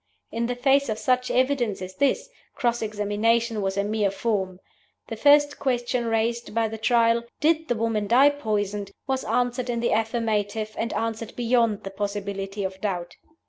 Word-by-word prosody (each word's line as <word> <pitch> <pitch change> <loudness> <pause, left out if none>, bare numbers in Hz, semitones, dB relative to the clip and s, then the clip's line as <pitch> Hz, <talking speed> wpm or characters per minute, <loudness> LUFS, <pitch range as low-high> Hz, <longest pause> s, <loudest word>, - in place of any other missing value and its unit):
In 235 +1 -1
the 245 - -2
face 275 +1 +3
of 215 - -1
such 250 +3 +1
evidence 255 -5 +1
as 185 0 -7
this, 380 - +1 0.3
cross 240 -2 0
examination 220 +2 0
was 195 0 -2
a 200 - +2
mere 210 -1 +1
form. 195 -3 -2 0.5
The 225 - -4
first 290 +4 +4
Question 245 -3 0
raised 230 0 -1
by 225 -1 +1
the 220 0 -7
Trial 230 0 +3 0.2
Did 320 +1 +2
the 240 - 0
Woman 220 -2 -1
Die 265 +6 +6
Poisoned? 210 -7 -2 0.2
was 265 -1 -1
answered 245 +2 -1
in 235 -1 -1
the 235 - 0
affirmative, 220 -1 -1
and 230 - -2
answered 225 0 -3
beyond 235 -3 +1
the 195 - -6
possibility 200 0 -4
of 190 0 -5
doubt. 180 -4 -3
225 Hz, 170 wpm, -25 LUFS, 205-245 Hz, 0.5 s, Die